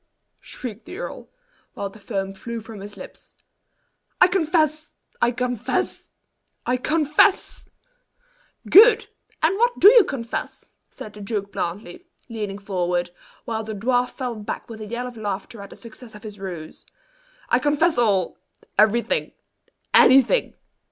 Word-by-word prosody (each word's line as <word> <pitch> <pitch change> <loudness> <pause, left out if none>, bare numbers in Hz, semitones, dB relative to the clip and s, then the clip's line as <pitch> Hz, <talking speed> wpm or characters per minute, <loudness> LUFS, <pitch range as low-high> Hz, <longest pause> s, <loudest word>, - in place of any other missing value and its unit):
shrieked 230 -3 -8
the - - -9
earl, - - -7 0.5
while 200 - -3
the 195 +2 -13
foam 195 -2 -4
flew 235 +4 -6
from 220 -1 -10
his 205 +1 -10
lips. - - -12 0.8
"I 365 - +8
confess! 315 -4 0 0.3
I - - +4
confess! 245 -1 -2 0.6
I 250 - +1
confess!" 305 - +1 1.0
"Good! 450 +3 +7 0.3
And 365 +6 +2
what 485 +1 +2
do 400 - +10
you 475 -3 +7
confess?" 265 -9 -5 0.2
said 210 - -10
the 210 - -11
duke 200 -1 -4
blandly, 210 - -5 0.2
leaning 210 -4 -4
forward, 180 -3 -2 0.3
while 225 -1 -3
the 220 0 -6
dwarf 245 +4 +1
fell 250 -2 -4
back 210 -2 -6
with 225 -2 -9
a 215 - -6
yell 235 +3 -4
of 245 -2 -8
laughter 205 +1 -5
at 200 - -10
the - - -12
success 230 0 -13
of 210 - -13
his 210 -2 -9
ruse. 175 -5 -8 0.7
"I 245 - +4
confess 295 +2 +2
all 200 -7 +1 0.4
everything 220 +2 +2 0.6
anything! 270 - +5
230 Hz, 140 wpm, -23 LUFS, 205-290 Hz, 1.0 s, do